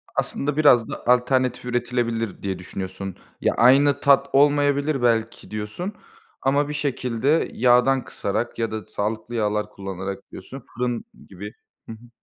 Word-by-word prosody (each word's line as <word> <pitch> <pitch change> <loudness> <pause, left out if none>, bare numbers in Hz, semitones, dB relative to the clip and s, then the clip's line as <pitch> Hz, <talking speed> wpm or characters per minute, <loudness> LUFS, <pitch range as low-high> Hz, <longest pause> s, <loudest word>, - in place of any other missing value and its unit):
Aslında 145 +1 -2
biraz 125 -7 +5
da - - -7
alternatif 125 0 +2
üretilebilir 120 -3 -2
diye 95 -2 -3
düşünüyorsun. 95 +1 -6 0.3
Ya, - - +2
aynı 140 +3 +5
tat 140 -1 +4
olmayabilir 145 0 +3
belki 115 -2 0
diyorsun 105 - -5 0.5
ama 140 +2 +1
bir 150 - -3
şekilde 140 0 0
yağdan 125 +2 +4
kısarak 110 +3 -4
ya 115 -1 -1
da 110 -3 -5
sağlıklı 110 +5 -4
yağlar 105 -1 0
kullanarak 95 0 -7
diyorsun, 135 -1 -10
fırın 120 -1 -2 0.2
gibi 100 +2 -9 0.4
Hı - - -5
hı. 120 +2 -15
120 Hz, 135 wpm, -23 LUFS, 105-135 Hz, 0.5 s, biraz